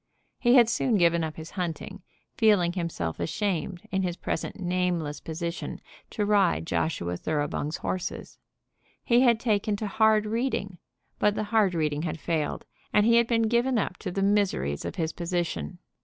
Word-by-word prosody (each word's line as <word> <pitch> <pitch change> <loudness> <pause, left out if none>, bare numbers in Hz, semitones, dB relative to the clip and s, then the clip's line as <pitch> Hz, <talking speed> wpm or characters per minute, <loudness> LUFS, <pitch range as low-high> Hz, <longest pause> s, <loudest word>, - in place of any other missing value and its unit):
He 240 +1 +4
had 240 -3 +7
soon 230 +1 +1
given 170 -3 +3
up 155 -1 -4
his 160 0 -9
hunting, 190 +2 -4 0.3
feeling 200 -6 +3
himself 165 - -3
ashamed, 185 - -2
in 190 - +1
his 180 -2 -2
present - - -4
nameless 175 -4 -1
position, 170 +1 -5 0.3
to 210 - -1
ride 200 -5 +2
Joshua 90 - -1
Thoroughbung's 150 - -2
horses. 185 - -4 0.6
He 235 0 +4
had 235 -3 +4
taken 215 -2 +1
to 215 - -4
hard 215 +1 +3
reading, 215 -5 -2 0.4
but 210 0 +3
the 215 - -1
hard 205 -5 +3
reading 150 -2 0
had 165 -1 -3
failed, 155 -2 -2 0.3
and 210 0 +4
he 230 +1 +5
had 235 0 +4
been 230 -1 +2
given 240 +3 +2
up 190 -4 -1
to - - -5
the 195 +2 -1
miseries 195 - +1
of - - -4
his 160 -4 -2
position. 170 - -3
185 Hz, 165 wpm, -27 LUFS, 165-215 Hz, 0.6 s, had